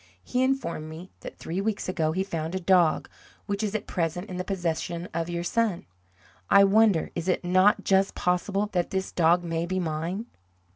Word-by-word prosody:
He 250 - -1
informed 260 -13 -1
me 165 +4 -10
that - - -9
three 175 +4 -3
weeks 210 0 -2
ago 160 -4 0
he 185 +4 0
found 165 -2 -4
a - - -1
dog, 180 -3 +3 0.4
which 200 0 -2
is 215 -1 -2
at 215 - -2
present 175 +3 -3
in 180 - -4
the 180 - -2
possession 175 -2 -3
of 165 +1 -2
your 170 0 -2
son. 215 0 0 0.6
I 200 - +7
wonder 200 -3 +4
is 170 +1 -4
it 180 -1 0
not 185 +3 +4
just 195 0 +2
possible 190 +3 0
that 175 -2 0
this 190 0 -2
dog 175 +1 +3
may 165 0 -2
be 185 +1 -1
mine?" 170 +5 -3
180 Hz, 190 wpm, -26 LUFS, 170-195 Hz, 0.6 s, I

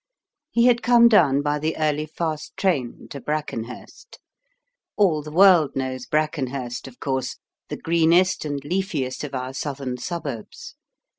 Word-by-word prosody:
He 235 0 +2
had 245 -1 +4
come 240 -1 +6
down 145 - +4
by 150 0 0
the 155 +2 -2
early 155 0 0
fast 155 -1 -4
train 145 -11 -1
to 140 - -7
Brackenhurst. 145 -6 -6 0.8
All 175 -7 +3
the 150 - -9
world 175 -3 +5
knows 130 -1 -3
Brackenhurst, 135 -5 -2
of 125 - -14
course, 130 -2 -2 0.3
the - - -4
greenest 170 +3 +3
and 145 -2 -3
leafiest 150 -6 -2
of 140 -2 -5
our 130 0 -4
southern 135 -2 -4
suburbs. 140 -7 -6
150 Hz, 140 wpm, -23 LUFS, 130-170 Hz, 0.8 s, come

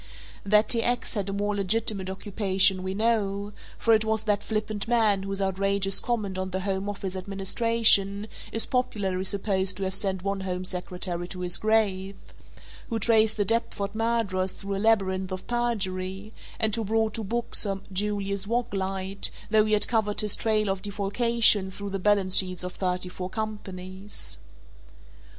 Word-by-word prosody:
That 210 +2 +4
T. 230 -2 +3
X. 245 +1 0
had 200 -3 -2
a - - -3
more 205 +1 -1
legitimate 200 -1 -1
occupation 190 -1 +1
we 190 +1 -3
know, 205 -2 0 0.2
for 230 - +3
it 215 0 +4
was 220 0 +1
that 210 -2 +1
flippant 215 -1 -3
man 220 -4 +3
whose 195 0 -3
outrageous 195 +1 +1
comment 205 -6 -2
on 185 0 -2
the 190 0 -3
Home 195 +1 -2
Office 195 -2 -4
Administration 200 +1 +2 0.3
is 225 - +1
popularly 195 -7 -1
supposed 195 -1 +1
to 195 - -3
have 190 0 -2
sent 190 -2 0
one 195 0 -1
Home 185 -1 -3
Secretary 180 -1 -2
to 180 0 -5
his 175 -1 0
grave, 200 -3 +1 0.7
who 230 - -1
traced 220 0 +3
the 205 - +1
Deptford 215 -3 -1
murderers 220 -5 0
through 195 0 -5
a 195 - -3
labyrinth 190 -4 +2
of 185 0 -5
perjury 200 -4 -2 0.3
and 220 -1 +2
who 230 - -2
brought 220 +1 0
to 225 - -3
book 235 +4 -3
Sir 195 -2 +2
Julius 200 0 -1
Waglite 195 -4 -1 0.2
though 215 -1 +5
he 215 - 0
had 210 - +3
covered 220 -3 +1
his 210 -2 +2
trail 215 -1 +1
of 195 -1 -1
defalcation 205 0 +3
through 200 +1 -7
the 195 - -2
balance 195 -1 +3
sheets 185 -2 +2
of 180 0 -5
thirty 180 -1 -1
four 180 0 -6
companies. 190 - -5
200 Hz, 165 wpm, -26 LUFS, 190-220 Hz, 0.7 s, though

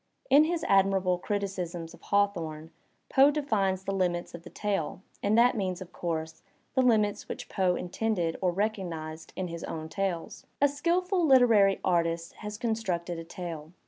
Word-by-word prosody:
In 290 +3 +7
his 330 0 -1
admirable 195 -2 +3
criticism 190 -4 -3
of - - -16
Hawthorne, 170 -6 -1 0.4
Poe 275 +1 +6
defines 205 -11 0
the 195 - -2
limits 175 -2 -1
of 170 - -8
the 175 - -11
tale, 195 -4 -2 0.2
and 210 +2 +2
that 245 +2 +5
means, 185 -4 -2
of 185 -2 -10
course, 160 -1 -4 0.3
the 260 - +3
limits 215 -5 +2
which - - -6
Poe 185 -2 +1
intended 180 -3 -1
or 185 -2 +2
recognized 170 -6 -3
in 185 - -3
his 170 0 -6
own 160 0 -5
tales: 185 -2 -3
"A 285 - +5
skilful 350 +6 0
literary 230 -7 +5
artist 170 -2 0
has 210 -1 -6
constructed 185 -7 -2
a - - -6
tale. 165 -2 -7
190 Hz, 160 wpm, -29 LUFS, 170-220 Hz, 0.4 s, In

